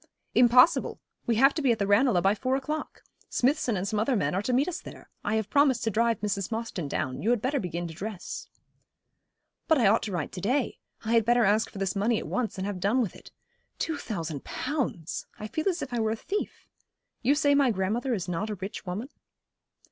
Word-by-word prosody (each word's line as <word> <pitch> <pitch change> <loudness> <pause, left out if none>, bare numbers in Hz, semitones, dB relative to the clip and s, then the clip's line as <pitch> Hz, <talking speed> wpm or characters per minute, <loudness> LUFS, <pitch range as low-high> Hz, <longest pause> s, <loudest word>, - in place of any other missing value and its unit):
'Impossible. 250 +6 +5 0.3
We 235 - +2
have 270 +5 +5
to 310 - -2
be 265 -4 +3
at 230 - +1
the 200 - 0
Ranelagh 205 -2 +3
by 195 +1 +4
four 255 +5 0
o'clock. 300 +3 -4 0.3
Smithson 255 -4 +1
and 185 +2 -2
some 210 +1 -1
other 245 +4 +1
men 200 - 0
are 190 - 0
to 230 - -2
meet 260 +4 +2
us 365 0 -4
there. - - -12
I 210 - 0
have 220 -2 0
promised 280 -4 +4
to 225 - 0
drive 230 +2 +1
Mrs. 200 -1 -2
Mostyn 220 -8 -3
down. 130 -2 -3
You 220 - 0
had 240 -1 +3
better 270 +5 0
begin 175 -3 -3
to 165 - -8
dress.' 195 +2 -6 1.2
'But 320 - +4
I 240 - +3
ought 210 +4 +5
to 215 - -4
write 170 -5 -3
to 180 - -7
day. 255 +7 0 0.3
I 225 - 0
had 230 -1 +5
better 240 +1 +4
ask 210 +3 +2
for - - -11
this 195 -1 -1
money 215 +3 +2
at - - -4
once, 245 -5 -2
and 190 - -3
have 200 -2 -3
done 205 +8 +2
with 225 -7 -1
it. - - -13 0.5
Two 320 -2 -2
thousand 165 - -4
pounds! 255 - -3
I 215 - -6
feel 315 - -1
as 350 -3 -2
if - - -7
I 240 - 0
were 220 -1 +1
a 220 - 0
thief. 395 - -4 0.6
You 270 +4 +3
say 290 -1 +3
my 280 -2 +4
grandmother 230 +5 0
is 185 -4 -4
not 180 +5 -2
a 210 - -2
rich 195 +2 -7
woman?' 205 +9 -4
225 Hz, 230 wpm, -28 LUFS, 195-255 Hz, 1.2 s, Impossible